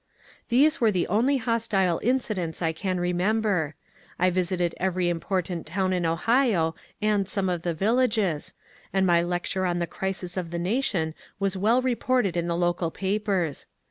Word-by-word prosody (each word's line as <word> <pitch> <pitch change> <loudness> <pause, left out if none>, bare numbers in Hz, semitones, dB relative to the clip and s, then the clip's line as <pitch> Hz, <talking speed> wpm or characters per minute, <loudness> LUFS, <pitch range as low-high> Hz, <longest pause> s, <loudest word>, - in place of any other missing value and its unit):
These 295 +6 +4
were 225 - +5
the 185 -4 +1
only 245 +8 +3
hostile 220 -7 +1
incidents 215 -10 -1
I 165 -2 0
can 185 +2 -2
remember. 180 -2 0 0.4
I 180 +1 +3
visited 180 -1 0
every 185 -1 0
important 175 0 -2
town 185 0 0
in 175 -2 0
Ohio 185 -2 +2 0.3
and 205 -2 +1
some 195 -2 0
of 175 -2 -1
the 170 -1 -2
viUages, 210 -5 +1 0.4
and 190 -1 +2
my 170 -2 +4
lecture 175 +2 -2
on 175 0 0
the 170 - 0
crisis 190 0 -4
of 180 -2 -3
the 170 - -4
nation 180 -4 0 0.3
was 195 -1 0
well 225 +7 +2
reported 250 -6 +1
in 170 0 -1
the 170 0 -1
local 175 -1 0
papers. 190 -4 -1
185 Hz, 160 wpm, -26 LUFS, 175-215 Hz, 0.4 s, were